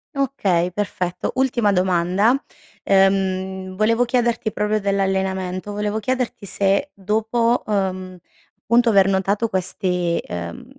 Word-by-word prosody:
Okay, 195 -11 0
perfetto. 180 -2 -3
Ultima 245 -5 +2
domanda, 185 +4 +2 0.5
ehm, 190 -1 +1
volevo 225 +4 +2
chiederti 240 -2 0
proprio 210 +1 0
dell'allenamento; 190 -1 -1
volevo 210 +1 -2
chiederti 250 -2 -2
se 200 +9 0
dopo, 220 +4 0
uhm, 185 -3 -2 0.5
punto 235 +1 +4
aver 195 -3 +5
notato 195 +3 +1
questi 180 -3 -1
ehm, 85 -1 -6
195 Hz, 105 wpm, -21 LUFS, 185-220 Hz, 0.5 s, aver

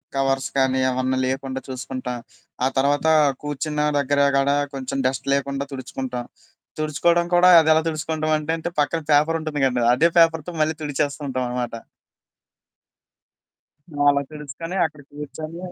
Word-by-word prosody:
Covers 135 -1 0
కానీ 130 -1 +2
ఏవన్నా 130 0 -1
లేకుండా 130 0 -3
చూసుకుంటా. 130 -1 -5 0.5
ఆ - - +4
తర్వాత 140 +3 +2 0.4
కూర్చున్న 150 +1 -2 0.2
దగ్గర 140 +1 +1 0.2
కాడా 140 +1 +2 0.2
కొంచెం 135 0 -4
డస్ట్ 130 +1 -4
లేకుండా 140 0 -1
తుడుచుకుంటా. 130 -1 -5 0.6
తుడుచుకోవడం 170 +3 +2
కూడా 175 +1 +6
అది 160 -1 +2
ఎలా 160 - +3
తుడుచుకుంటామంటే 155 -1 -1
అంటే 165 +1 -4
పక్కన 165 +3 -1
పేపరుంటుంది 155 0 +1
కదండీ! 125 -2 0
అదే 160 +6 +4
పేపర్‌తో 165 0 +3
మళ్ళీ 155 +1 +1
తుడిచేస్తూ 145 0 -2
ఉంటాం 130 -1 -2
అనమాట. 125 -1 -3 2.4
అలా 140 0 +2
తెలుసుకొని, 150 +4 -7
అక్కడ 150 -2 -7
కూర్చొని 155 +3 -8
145 Hz, 125 wpm, -22 LUFS, 130-155 Hz, 2.4 s, కూడా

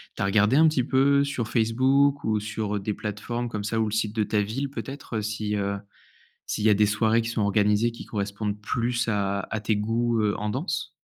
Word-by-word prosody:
tu - - -6
as - - +2
regardé 105 +5 +3
un 160 +1 +6
petit 145 -5 +2
peu 140 +2 +3
sur 140 -5 -2
Facebook 130 +5 +2
ou 110 -1 +1
sur, 105 0 -3
heu, - - -1
des 105 +2 -2
plateformes 120 +4 -4
comme 105 -2 -4
ça 110 +2 -1
ou 110 - +2
le 105 - -3
site 110 0 -1
de 110 - +2
ta 105 0 +1
ville 135 +7 -3
peut 140 - -5
être, 135 -4 -7
heu, - - -1
si 105 0 -2
heu, 100 0 -1 0.7
s'il 105 - -3
y - - +5
a - - +6
des 105 +1 +4
soirées 110 +2 +2
qui 115 - -4
sont 115 - -2
organisées 105 +3 +2
qui 115 - -10
correspondent 105 0 -3
plus 120 +3 -1
à 100 -2 0
à 110 - -2
tes 110 0 0
goûts, 115 +2 0
heu, 105 -1 +1
en 105 0 -2
danse? 140 - -3
110 Hz, 240 wpm, -25 LUFS, 105-120 Hz, 0.7 s, un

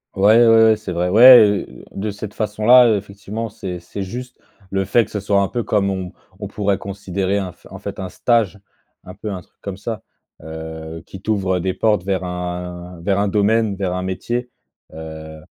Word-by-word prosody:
Ouais, 110 +5 +5
ouais, 115 0 +6
ouais, 110 0 +5
c'est 105 -3 -7
vrai. 90 +1 0
Ouais, 110 0 +7
heu, - - -14
de 100 +2 -3
cette 105 +1 -8
façon-là, 110 +4 +5
heu, 110 - +3
effectivement, 105 +3 -6
c'est 95 -4 -7
c'est 95 +3 -6
juste 125 +6 -7 0.3
le 95 0 0
fait 110 +4 +2
que 105 - -18
ce 105 - -3
soit 100 0 +2
un 100 - +1
peu 120 -1 -3
comme 100 -2 +1
on 95 -2 -4 0.3
on 100 - -4
pourrait 100 -1 0
considérer 100 0 -3
un 95 -3 -4
f - - -26
en - - -10
fait, - - -7
un 95 -1 -5
stage, 105 -3 +1 0.5
un - - -9
peu 105 - -6
un 95 -2 -5
truc - - -26
comme 100 -2 -6
ça, 110 +1 -5 0.4
heu, 80 0 -7
qui 95 - -11
t'ouvre 95 -4 0
des 95 +1 -1
portes 105 -1 +1
vers 95 -1 -2
un 90 0 -6
vers 100 +3 0
un 100 0 +1
domaine, 105 +1 +2
vers 95 -2 -2
un 90 0 -3
métier. 120 +7 -3 0.4
Heu, 80 0 -9
100 Hz, 205 wpm, -20 LUFS, 90-110 Hz, 0.5 s, Ouais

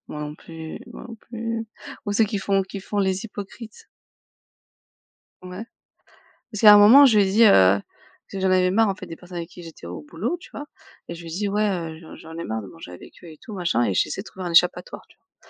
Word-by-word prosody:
Moi 150 - -7
non 150 0 -6
plus, 160 0 -10
moi - - -10
non 230 - -8
plus, 230 0 -6 0.4
ou 205 - -2
ceux 220 +1 +3
qui 210 -1 -3
font 195 0 +1
qui 195 +1 -8
font 205 +1 -5
les 190 +1 0
hypocrites. 215 +1 -10 1.6
Ouais 185 +4 -8 0.9
parce 210 - -6
qu'il 215 - +5
y - - +13
a 210 - +10
un - - +8
moment 235 +8 +8
je 220 -4 +3
lui 205 - +6
ai 190 - -2
dit, 225 +3 +5
heu- - - +8
parce 95 +1 +1
que 195 - -5
j'en 190 0 +1
avais 185 0 +3
marre 225 +2 +3
en 195 - 0
fait, - - -10
des 165 - -8
personnes 180 +1 -11
avec 170 0 -6
qui 175 - -12
j'étais 165 - -12
au 85 -2 -7
boulot, 230 - -3
tu - - -15
vois- 290 - -7 0.4
et 170 - -6
je 170 - -11
lui 165 - -9
dis: 200 +4 -2
«Ouais, 210 +1 +1
heu, 165 -4 -4
j'en 160 - -12
j'en 160 +1 -11
ai 170 - -5
marre 110 0 -4
de 100 - -10
manger 90 +1 -12
avec 90 - -13
eux - - -11
et 155 - -14
tout, 215 - -10
machin, 175 - 0
et 100 - 0
j'essaie 195 - -1
de - - -11
trouver 190 -3 -9
un 175 - -3
échappatoire» 180 - +2
tu - - -24
vois? 375 - -53
190 Hz, 260 wpm, -23 LUFS, 165-210 Hz, 1.6 s, y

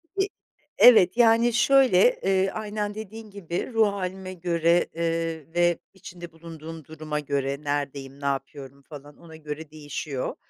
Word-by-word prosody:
E 390 0 +1 0.5
evet, 225 -5 +7
yani, 230 0 +4
şöyle, 275 - +4
eee, 195 0 +2
aynen 210 -1 -4
dediğin 220 0 -9
gibi, 195 +4 -5
ruh 220 -2 +4
hâlime 190 -1 -4
göre, 170 -1 +1
eee, 165 -1 -3
ve 175 0 +2 0.2
içinde 175 -3 -11
bulunduğum 165 -1 -10
duruma 155 0 -5
göre; 140 0 -2
neredeyim, 140 -1 -4
ne - - -6
yapıyorum, 140 0 -4
falan 145 -1 -11
ona 160 -2 -14
göre 155 0 -7
değişiyor, 145 -3 -5
170 Hz, 135 wpm, -25 LUFS, 150-200 Hz, 0.5 s, evet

